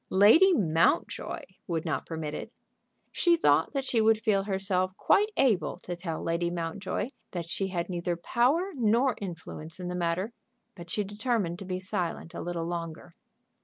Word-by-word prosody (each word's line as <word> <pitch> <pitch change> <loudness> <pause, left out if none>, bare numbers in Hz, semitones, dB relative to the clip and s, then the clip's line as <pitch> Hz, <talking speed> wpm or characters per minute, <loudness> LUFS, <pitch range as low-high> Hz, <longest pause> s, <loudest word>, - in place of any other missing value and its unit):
Lady 225 - +7
Mountjoy 165 -5 +1 0.3
would 165 -2 -2
not - - -2
permit 160 -2 -4
it! - - -6 0.6
She 345 -1 +3
thought 330 - +3
that 275 -2 -1
she 235 -4 +2
would 220 0 +4
feel 210 -3 +2
herself 190 -1 0
quite 420 +2 +4
able 235 -9 +2
to 175 - -4
tell 170 -2 -4
Lady 170 +1 0
Mountjoy 175 +6 -3 0.2
that 170 -2 -4
she 190 +3 -2
had 175 -2 -2
neither 175 -1 -2
power 260 - +1
nor 245 0 +3
influence 165 -3 -6
in 180 -1 -4
the - - -3
matter, 180 +5 -1 0.4
but 170 -2 -11
she 210 +3 0
determined 205 -3 -1
to 195 - -7
be 185 0 -3
silent 180 -3 -3
a - - -5
little 170 -1 -3
longer. 170 0 -5
185 Hz, 165 wpm, -29 LUFS, 170-220 Hz, 0.6 s, Lady